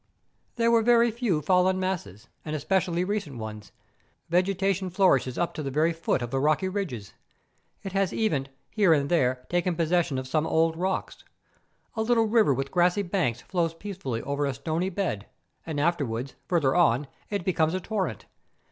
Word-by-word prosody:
There 230 Hz, -1 st, +2 dB
were 230 Hz, -1 st, +5 dB
very 235 Hz, 0 st, +4 dB
few 215 Hz, -, -1 dB
fallen 185 Hz, +2 st, +3 dB
masses, 170 Hz, -, -4 dB, 0.2 s
and 155 Hz, -1 st, -4 dB
especially 175 Hz, +2 st, 0 dB
recent 185 Hz, -, -3 dB
ones. 110 Hz, -2 st, -7 dB, 0.6 s
Vegetation 190 Hz, +1 st, +1 dB
flourishes 170 Hz, -9 st, +2 dB
up 175 Hz, -, -1 dB
to -, -, -5 dB
the 140 Hz, -, -3 dB
very 155 Hz, +5 st, +2 dB
foot 160 Hz, -6 st, -1 dB
of 120 Hz, -, -5 dB
the 135 Hz, -, 0 dB
rocky 155 Hz, +6 st, +2 dB
ridges. 170 Hz, -, -4 dB, 0.7 s
It 195 Hz, -, -5 dB
has 195 Hz, -1 st, +1 dB
even, 150 Hz, -12 st, 0 dB, 0.2 s
here 200 Hz, -6 st, +4 dB
and 140 Hz, -2 st, +1 dB
there, 130 Hz, -6 st, +1 dB
taken 175 Hz, +2 st, 0 dB
possession 165 Hz, -3 st, +1 dB
of 130 Hz, 0 st, -4 dB
some 155 Hz, +3 st, 0 dB
old 165 Hz, 0 st, +2 dB
rocks. 185 Hz, +3 st, -3 dB, 0.7 s
A 220 Hz, -, -1 dB
little 225 Hz, 0 st, +3 dB
river 220 Hz, -7 st, +4 dB
with 135 Hz, +1 st, -2 dB
grassy 180 Hz, +3 st, +2 dB
banks 175 Hz, -, -1 dB
flows 170 Hz, -3 st, -1 dB
peacefully 165 Hz, -, -5 dB
over 140 Hz, +1 st, -1 dB
a 135 Hz, -, -2 dB
stony 160 Hz, +7 st, -2 dB
bed, 175 Hz, -, -3 dB, 0.4 s
and 155 Hz, -3 st, -2 dB
afterwards, 140 Hz, -6 st, -1 dB
further 155 Hz, -7 st, +2 dB
on, 145 Hz, -6 st, +3 dB, 0.2 s
it 200 Hz, -4 st, -3 dB
becomes 165 Hz, -2 st, +1 dB
a -, -, 0 dB
torrent. 185 Hz, -, -3 dB
170 Hz, 170 wpm, -27 LUFS, 140-190 Hz, 0.7 s, were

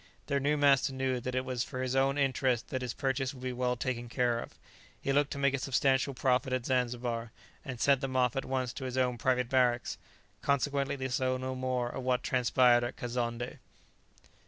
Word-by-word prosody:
Their 140 Hz, -1 st, 0 dB
new 145 Hz, +2 st, +1 dB
master 140 Hz, -2 st, +4 dB
knew 130 Hz, -1 st, -1 dB
that 125 Hz, +1 st, -4 dB
it 130 Hz, 0 st, 0 dB
was 125 Hz, -2 st, -1 dB
for 130 Hz, -2 st, -4 dB
his 130 Hz, 0 st, -1 dB
own 135 Hz, +1 st, +2 dB
interest 130 Hz, -3 st, +1 dB
that 130 Hz, -, -2 dB
his 125 Hz, -2 st, -3 dB
purchase 135 Hz, -1 st, 0 dB
should 130 Hz, -, -8 dB
be 130 Hz, -1 st, -3 dB
well 125 Hz, 0 st, 0 dB
taken 120 Hz, -1 st, -3 dB
care 120 Hz, -1 st, +1 dB
of; -, -, -9 dB, 0.4 s
he 135 Hz, -, -1 dB
looked 145 Hz, +1 st, +3 dB
to -, -, -6 dB
make 140 Hz, -1 st, +2 dB
a 135 Hz, -, 0 dB
substantial 135 Hz, 0 st, +1 dB
profit 130 Hz, +1 st, +1 dB
at 130 Hz, -2 st, -1 dB
Zanzibar, 120 Hz, -2 st, -1 dB, 0.3 s
and 130 Hz, -3 st, -6 dB
sent 140 Hz, 0 st, +3 dB
them 135 Hz, -2 st, -3 dB
off 125 Hz, -2 st, +2 dB
at 135 Hz, -, -1 dB
once 130 Hz, -2 st, -2 dB
to 135 Hz, -, -6 dB
his 130 Hz, 0 st, -4 dB
own 125 Hz, -2 st, +1 dB
private 125 Hz, 0 st, +1 dB
barracks; 125 Hz, -1 st, +1 dB, 0.4 s
consequently 140 Hz, 0 st, 0 dB
they 130 Hz, -1 st, -3 dB
saw 130 Hz, 0 st, 0 dB
no 130 Hz, 0 st, -3 dB
more 130 Hz, -1 st, -1 dB
of 130 Hz, -, -5 dB
what 125 Hz, 0 st, 0 dB
transpired 125 Hz, -1 st, +4 dB
at 120 Hz, -, -3 dB
Kazonndé. 120 Hz, 0 st, -3 dB
130 Hz, 205 wpm, -31 LUFS, 125-135 Hz, 0.4 s, master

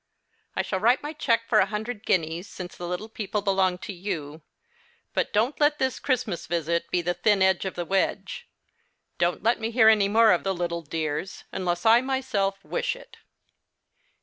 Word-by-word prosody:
I -, -, 0 dB
shall 190 Hz, -, -2 dB
write 240 Hz, +7 st, +3 dB
my 295 Hz, +1 st, -4 dB
cheque 230 Hz, -7 st, +1 dB
for 220 Hz, -, +4 dB
a 190 Hz, -, +4 dB
hundred 215 Hz, +1 st, -5 dB
guineas, 165 Hz, +2 st, 0 dB
since 180 Hz, -3 st, -8 dB
the 175 Hz, -, -6 dB
little 180 Hz, +5 st, -4 dB
people 210 Hz, -2 st, -3 dB
belong 190 Hz, -2 st, +2 dB
to 205 Hz, -, -5 dB
you; 160 Hz, -5 st, -5 dB, 0.7 s
but -, -, 0 dB
don't 225 Hz, +7 st, +1 dB
let 295 Hz, 0 st, +3 dB
this 260 Hz, -2 st, -1 dB
Christmas 245 Hz, -9 st, -1 dB
visit 170 Hz, 0 st, -1 dB
be 175 Hz, -, 0 dB
the 175 Hz, +1 st, 0 dB
thin 205 Hz, 0 st, +2 dB
end 190 Hz, 0 st, +2 dB
of 190 Hz, -, -4 dB
the 175 Hz, -, -3 dB
wedge. 195 Hz, +2 st, -1 dB, 0.7 s
Don't 175 Hz, 0 st, +1 dB
let 230 Hz, +2 st, +2 dB
me 225 Hz, 0 st, -2 dB
hear 225 Hz, -1 st, +6 dB
any 210 Hz, -2 st, +4 dB
more 220 Hz, +2 st, +5 dB
of 175 Hz, -, +2 dB
the 195 Hz, -1 st, -1 dB
little 170 Hz, -1 st, -2 dB
dears, 160 Hz, +3 st, -4 dB
unless 175 Hz, -1 st, -2 dB
I 230 Hz, +2 st, +7 dB
myself 255 Hz, -7 st, -1 dB
wish -, -, -1 dB
it. -, -, -15 dB
195 Hz, 185 wpm, -26 LUFS, 175-225 Hz, 0.7 s, I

